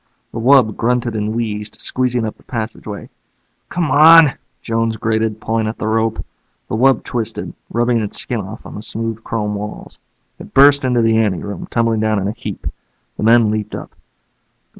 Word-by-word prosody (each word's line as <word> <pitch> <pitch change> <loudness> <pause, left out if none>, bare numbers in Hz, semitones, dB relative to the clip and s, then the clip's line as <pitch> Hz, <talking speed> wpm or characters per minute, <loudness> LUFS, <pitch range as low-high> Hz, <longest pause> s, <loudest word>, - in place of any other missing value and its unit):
The 115 - -5
wub 125 -3 +4
grunted 120 0 0
and 105 +1 -2
wheezed, 105 -2 -3
squeezing 125 -2 0
up 110 - -5
the - - -25
passageway. 110 -3 -6 0.6
"Come 170 -5 -1
on," 155 0 +8 0.3
Jones 115 -1 -1
grated, 110 0 -1
pulling 110 0 -1
at 110 - -4
the 110 - -3
rope. 110 0 0 0.4
The - - -2
wub 135 +4 +3
twisted, 115 -3 -4 0.2
rubbing 120 +1 +1
its 105 -2 -3
skin 120 - -2
off 100 +3 -9
on - - -9
the 105 - -7
smooth 115 0 -4
chrome 105 -2 -2
walls. 105 +1 -7 0.4
It - - -12
burst 140 +1 +6
into 125 -2 +2
the 115 0 +3
ante 105 -5 0
room, 100 0 -6
tumbling 115 -1 +1
down 110 0 +1
in 95 0 -1
a - - -1
heap. 110 -3 -7 0.5
The - - -6
men 115 0 +5
leaped 105 -1 -3
up. - - -8
115 Hz, 180 wpm, -18 LUFS, 110-120 Hz, 0.6 s, on